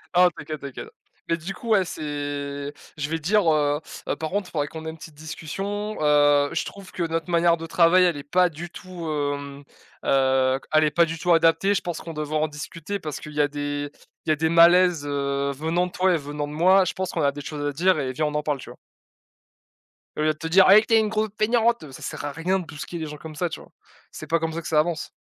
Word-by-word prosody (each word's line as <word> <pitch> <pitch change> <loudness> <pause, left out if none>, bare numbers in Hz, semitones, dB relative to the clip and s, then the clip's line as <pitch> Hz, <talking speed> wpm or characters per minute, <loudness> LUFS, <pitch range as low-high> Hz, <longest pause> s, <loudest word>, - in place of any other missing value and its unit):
Non 180 0 +7
t’inquiète, 155 -1 -7
t’inquiète. 140 -2 -7 0.4
Mais 165 - +2
du 180 +4 -6
coup, 230 +5 -8
ouais, 195 -4 +4
c'est 160 - -7 1.0
je 150 0 -3
vais 165 - -1
dire: 195 +4 +2
«Heu 145 -1 +1 0.3
heu, - - 0
par 160 +1 -5
contre, 200 -2 -2
faudrait 145 -2 -1
qu'on 160 +1 -8
ait 160 - -3
une 160 - -8
petite 160 0 -12
discussion, 195 +8 -5
heu, 145 -1 +4
je - - -1
trouve 195 -2 -10
que 175 - -3
notre 165 +1 -2
manière 170 0 +4
de 165 0 -7
travail, 180 +2 +5
elle 170 -5 +1
est 140 - -7
pas 180 +4 +3
du 170 +2 -8
tout, 180 -3 -8
hem, 145 -1 -3 0.4
heu, 130 -1 +3
elle 155 - +5
est 155 - +3
pas 170 +2 +4
du 165 0 -5
tout 175 +1 +1
adaptée, 165 +4 +4
je - - 0
pense 175 -2 -4
qu'on 165 - -7
devrait 155 0 -2
en 155 - +1
discuter 165 +5 -6
parce 155 -6 -6
qu'il 150 -1 -10
y 150 - +1
a 145 - +3
des 145 0 -4 0.3
il - - -4
y - - +5
a - - +4
des 160 +1 0
malaises, 170 -1 +5
heu, 140 -1 -1
venant 160 +5 0
de 180 - -7
toi 185 +1 +2
et - - +1
venant 145 0 -5
de 145 - -8
moi, 185 +5 +5
je - - -2
pense 185 -1 -3
qu'on - - -2
a 140 -1 +3
des 145 - -8
choses 145 0 -6
à 145 - -2
dire 180 +2 +2
et 130 -2 -2
viens, 155 +4 -1
on 150 - -2
en 150 - 0
parle». 150 -2 -1
Tu - - -10
vois? - - -14 1.4
Au - - -1
lieu 155 - +2
de 155 - -22
te 165 - -5
dire: 185 +3 +6
«Ouais, 205 +3 +9
tu 225 - 0
es - - +7
une 220 - +1
grosse 215 0 0
feignante!» 230 - +1
Ça 130 - -11
sert - - -5
à 145 - -3
rien 180 +5 0
de 175 - -7
brusquer 160 +2 -7
les 160 - -4
gens 150 -1 -7
comme 155 +1 -10
ça, 175 +4 -1
tu 160 - -6
vois? - - -16 0.4
C'est - - -9
pas 165 - +2
comme 160 0 -2
ça 165 - -4
que - - -8
ça 155 -2 +3
avance. 160 0 -1
160 Hz, 265 wpm, -24 LUFS, 145-180 Hz, 1.4 s, Ouais